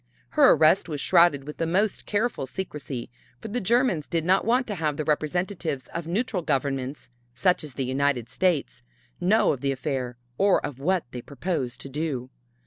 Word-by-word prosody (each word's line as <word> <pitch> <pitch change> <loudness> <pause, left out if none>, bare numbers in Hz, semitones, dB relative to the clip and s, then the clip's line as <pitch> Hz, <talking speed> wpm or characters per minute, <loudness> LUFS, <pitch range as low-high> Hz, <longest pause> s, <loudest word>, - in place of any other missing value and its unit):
Her - - +6
arrest 165 +4 +4
was 150 -2 -3
shrouded 170 -4 +4
with 150 - -8
the 165 - -1
most 195 +4 0
careful 210 - -1
secrecy, 140 -7 -6 0.3
for 220 - -7
the 245 +4 -2
Germans 215 - +2
did 165 -1 -1
not 190 +2 +3
want 250 +3 +3
to 215 - -4
have 155 -5 -1
the 155 - -1
representatives 155 - -1
of 170 -1 -4
neutral 195 +1 -1
governments, 135 -3 -2 0.2
such 180 +5 +2
as 150 -3 -9
the 135 - -1
United 130 -2 0
States, 175 0 0 0.4
know 195 +5 +3
of 130 - -7
the 140 - +1
affair 130 -3 -3 0.2
or 200 -1 +4
of 135 -3 -6
what 180 +5 +1
they 125 - -6
proposed 140 -2 -3
to 135 - -7
do. 135 -3 -3
155 Hz, 180 wpm, -26 LUFS, 135-185 Hz, 0.4 s, Her